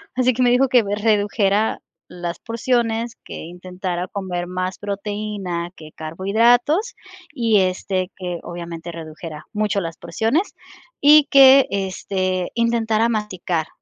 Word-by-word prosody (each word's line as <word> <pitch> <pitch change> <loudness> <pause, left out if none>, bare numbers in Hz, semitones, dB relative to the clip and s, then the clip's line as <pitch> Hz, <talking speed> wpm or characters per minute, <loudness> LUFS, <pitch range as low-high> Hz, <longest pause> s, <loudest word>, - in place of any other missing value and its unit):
así 255 0 +3
que 255 - -2
me 245 - +4
dijo 255 +2 +3
que 245 -2 +5
redujera 205 0 +1 0.3
las 175 -1 -6
porciones 230 0 -1
que - - -9
intentara 180 +1 -5
comer 180 -3 -4
más 185 +1 -3
proteína 200 -4 -4
que 155 -1 -12
carbohidratos 235 - +1 0.4
y 230 -7 +2
este 185 0 -1
que 180 -2 -5
obviamente 170 -1 -7
redujera 160 -1 -9
mucho 210 -1 0
las 165 -1 -6
porciones 225 - -1 0.5
y 295 0 +7
que 270 -1 +7
este 185 -1 -2
intentara 230 -1 +1
masticar, 185 -7 -2
200 Hz, 120 wpm, -21 LUFS, 180-230 Hz, 0.5 s, y